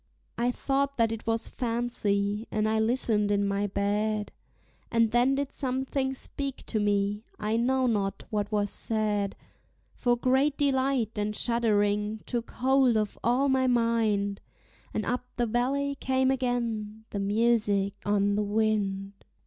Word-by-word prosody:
I 240 +1 +1
thought 275 +2 -1
that 230 -1 +3
it 225 0 -6
was 225 0 0
fancy, 220 -3 -1
and 215 0 0
I 220 0 +1
listened 220 -2 +2
in 200 0 +2
my 200 +1 0
bed; 205 +2 -1 0.6
And 230 -1 +2
then 245 +3 +3
did 280 0 -2
something 265 0 -2
speak 275 0 -4
to 220 - -1
me, 205 0 0
I 215 +1 -1
know 260 +3 +2
not 205 -5 -1
what 210 -1 -1
was 205 -1 0
said; 210 -3 0 0.6
For 240 -2 +1
great 265 +4 +2
delight 265 -6 +1
and 210 +1 -1
shuddering 210 -2 +1
took 235 -2 -3
hold 260 -2 +3
of 215 -1 -2
all 250 +4 +2
my 265 -1 +2
mind, 225 -4 +1 0.5
And 215 - -2
up 250 +1 -2
the 240 - +1
valley 270 +5 0
came 260 -1 +1
again 230 -4 -2
the 200 - -3
music 205 -1 +2
on 205 0 +2
the 210 - +1
wind. 205 -2 0
225 Hz, 145 wpm, -28 LUFS, 205-250 Hz, 0.6 s, that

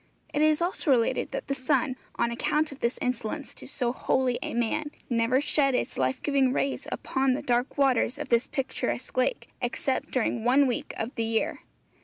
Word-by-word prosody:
It 295 - +1
is 310 +1 +4
also 350 -3 -1
related 240 -4 +3
that - - -4
the 275 - -1
sun, 260 0 +1 0.2
on 235 0 +1
account 300 +6 0
of 280 - -10
this 235 +1 0
insolence 250 +3 -2
to - - -10
so 245 -3 -1
holy 255 -1 +1
a - - -4
man, 240 +6 0 0.2
never 235 +2 +3
shed 275 -2 +2
its - - -1
life 130 0 0
giving 275 -3 +3
rays 275 +1 -1
upon 265 -1 +1
the 255 - -3
dark 245 0 0
waters 265 -2 +3
of 295 -1 -5
this 235 0 +3
picturesque 265 -3 -3
lake, 255 - 0
except 260 +2 -1
during 240 -2 0
one 265 +4 +5
week 250 -3 -2
of 230 +5 -3
the 230 - -1
year. 225 0 0
255 Hz, 190 wpm, -27 LUFS, 240-280 Hz, 0.2 s, one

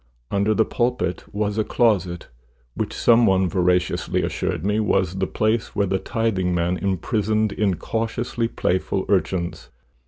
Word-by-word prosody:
Under 100 +2 +2
the 110 - +3
pulpit 120 -8 -1
was 105 +1 -1
a - - +3
closet, 95 -8 +1 0.5
which - - -3
some 115 0 +4
one 95 -1 +3
veraciously 90 -1 +1
assured 90 -2 -2
me 105 +1 +1
was 95 -4 +1
the 95 - 0
place 110 +1 -1
where 100 - +2
the 95 0 0
tithingman 90 -6 0
imprisoned 105 +3 0
incautiously 115 +4 -1
playful 95 -2 -1
urchins. 90 -8 -1
100 Hz, 130 wpm, -22 LUFS, 90-110 Hz, 0.5 s, some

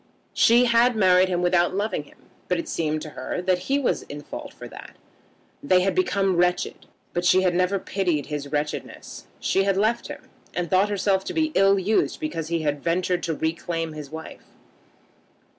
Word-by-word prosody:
She 240 +2 +5
had 235 +1 +4
married 185 -2 +4
him 180 -1 0
without 175 0 +2
loving 200 -7 -2
him, - - -20 0.3
but 180 - +1
it 170 - -4
seemed 155 -1 -2
to 155 - -8
her 130 +6 -4
that 185 -1 +2
he 275 - +3
was 280 - 0
in 145 +1 -9
fault - - -8
for - - -10
that. - - -12 0.7
They 180 +5 +3
had 195 - +1
become 195 - +1
wretched, 180 0 0 0.3
but 175 - -1
she 185 +2 +4
had 180 -1 +2
never 180 +2 +1
pitied 180 -6 -1
his 145 -1 -5
wretchedness. 150 0 -4
She 195 - +1
had 195 -1 +1
left 220 +4 +1
him, - - -8 0.3
and 175 -2 -2
thought 190 +2 +3
herself 195 -1 +1
to - - -5
be 315 -1 +1
ill 195 0 +4
used 200 +3 +1
because 305 - -4
he 165 -1 -1
had 145 -1 -1
ventured 175 +1 0
to 165 - -2
reclaim 165 +1 -2
his 150 -2 -8
wife. 160 +1 -9
180 Hz, 190 wpm, -24 LUFS, 165-195 Hz, 0.7 s, She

